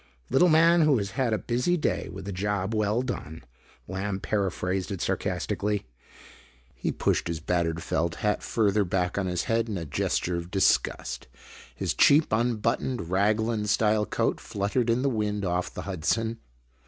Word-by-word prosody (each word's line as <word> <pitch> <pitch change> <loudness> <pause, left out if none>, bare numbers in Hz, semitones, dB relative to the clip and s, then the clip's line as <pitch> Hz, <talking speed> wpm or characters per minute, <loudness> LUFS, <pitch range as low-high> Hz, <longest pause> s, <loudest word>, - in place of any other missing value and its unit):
"Little 180 - +5
man 165 +2 +5
who 150 -4 +4
has 100 -2 -3
had 125 +3 0
a 110 - +2
busy 125 +11 0
day 155 - -1
with 95 - -8
a - - -3
job 100 +2 -1
well 110 +3 +1
done," 80 - -5 0.4
Lamb 95 +1 -3
paraphrased 95 -2 -1
it 95 - -4
sarcastically. 105 +3 -1 0.9
He - - -2
pushed - - 0
his 85 -2 -3
battered 85 0 -1
felt 85 +1 -1
hat 105 0 0
further 105 -2 +1
back 90 0 -1
on 95 - -1
his 90 -1 -1
head 115 0 0
in 100 - -2
a 85 - -4
gesture 85 +4 -1
of 85 0 -6
disgust. 95 0 +1 0.5
His - - -1
cheap 150 +2 +5
unbuttoned 115 -3 0
raglan 105 +2 +1
style 105 0 +2
coat - - 0
fluttered 105 +4 -1
in 120 +3 +2
the - - +2
wind 105 -5 -1
off 90 0 -1
the - - -6
Hudson. 110 +5 -1
105 Hz, 165 wpm, -27 LUFS, 90-115 Hz, 0.9 s, Little